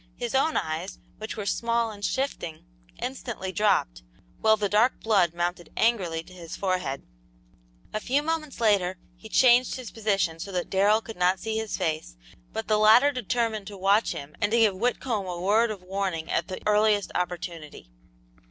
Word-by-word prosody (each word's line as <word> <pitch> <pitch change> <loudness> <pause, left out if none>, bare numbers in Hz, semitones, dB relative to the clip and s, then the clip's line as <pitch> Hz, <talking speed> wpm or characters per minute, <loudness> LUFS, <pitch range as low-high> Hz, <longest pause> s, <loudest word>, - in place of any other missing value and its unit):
His 240 +1 -4
own 275 +4 +2
eyes, 160 +4 -3 0.2
which 220 +1 -6
were 210 - -4
small 230 +1 0
and 205 -1 -11
shifting, 230 - -3 0.3
instantly 240 -7 -4
dropped, 190 - +1 0.4
while 220 0 +4
the 210 -1 0
dark 215 +6 +3
blood 190 -7 +2
mounted 175 -1 -3
angrily 185 -8 +1
to 185 - -16
his 170 -3 -8
forehead. 180 -8 -2 0.9
A 215 - -1
few 270 +6 0
moments 310 -4 -3
later, 195 -5 +2 0.2
he 220 +5 -13
changed 250 +1 +5
his 255 -3 -7
position 195 -7 0
so 195 +4 -6
that 180 -1 -3
Darrell 205 +3 +4
could 225 -2 -9
not 180 +1 +2
see 220 +2 -3
his 220 -1 -3
face, 155 - -3 0.3
but - - -4
the 215 0 +2
latter 225 +7 +6
determined 230 -4 -2
to 205 - -8
watch 200 +4 +3
him 145 +1 -8
and 205 -1 +1
to 235 - +3
give 220 -4 +4
Whitcomb 225 -1 -1
a 175 -1 -4
word 215 +6 +3
of 205 -4 -6
warning 185 -4 -3
at 170 - 0
the 185 - -5
earliest 210 -1 +3
opportunity. 170 - -5
205 Hz, 175 wpm, -26 LUFS, 180-225 Hz, 0.9 s, latter